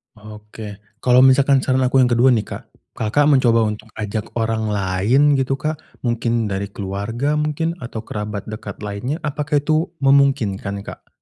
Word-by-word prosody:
Oke. 105 -1 -10 0.2
Kalau 125 0 +5
misalkan 135 +1 +5
saran 130 0 +1
aku 130 +1 +3
yang 125 - +5
kedua 120 +2 +4
nih, 110 -4 +1
Kak, - - -7 0.3
Kakak 115 +7 +2
mencoba 120 -5 +4
untuk 105 0 -7
ajak 105 0 -5
orang 110 -1 -1
lain 105 +9 +2
gitu, 135 0 0
Kak. 155 +2 -2 0.3
Mungkin 115 -1 0
dari 95 +1 -2
keluarga 105 +9 -2
mungkin, 155 +2 -1
atau 115 -6 -6
kerabat 105 -1 -5
dekat 110 -1 -7
lainnya. 105 +9 -4
Apakah 150 0 -1
itu 155 +3 0
memungkinkan, 120 -8 +2
Kak? - - -10
120 Hz, 155 wpm, -20 LUFS, 105-140 Hz, 0.3 s, Kalau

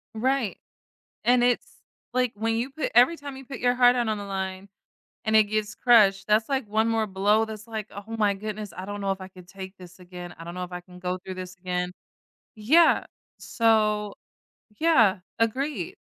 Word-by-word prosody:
Right. 250 -1 0 0.7
And 245 0 +4
it's 245 0 +2 0.5
Like, 250 -1 +1
when 225 +2 -1
you 235 +4 -1
put 310 +3 -3
every 250 +8 +6
time 280 -2 -8
you 270 - -11
put 270 -1 -7
your 245 0 +3
heart 245 0 +6
out 240 -2 0
on 215 - -1
the 205 - -6
line 190 0 -4 0.6
and 220 0 +2
it 220 - +8
gets 215 0 -2
crushed, 210 -6 +4
that's 215 +1 +3
like 265 -4 -1
one 220 +2 +1
more 225 -1 +1
blow 205 +3 +2
that's 215 -1 -7
like, 220 -2 -5
"Oh 205 +3 -7
my 205 -2 +2
goodness, 210 0 -6
I 185 - -5
don't 205 +1 -6
know 195 - -1
if 195 - -3
I 190 - -8
could 185 -1 -15
take 190 0 -9
this 180 -1 -13
again, 180 -1 -9
I 165 - -9
don't 170 +1 -7
know 180 0 -4
if 180 - -8
I 180 0 -5
can 180 0 -15
go 180 0 -2
through 185 +1 -8
this 185 0 -7
again." 180 0 -2 0.7
Yeah. 300 +11 +4 0.3
So 215 -2 +1 0.7
Yeah, 235 - +4 0.2
agreed. 230 - -1
215 Hz, 200 wpm, -26 LUFS, 190-235 Hz, 0.7 s, it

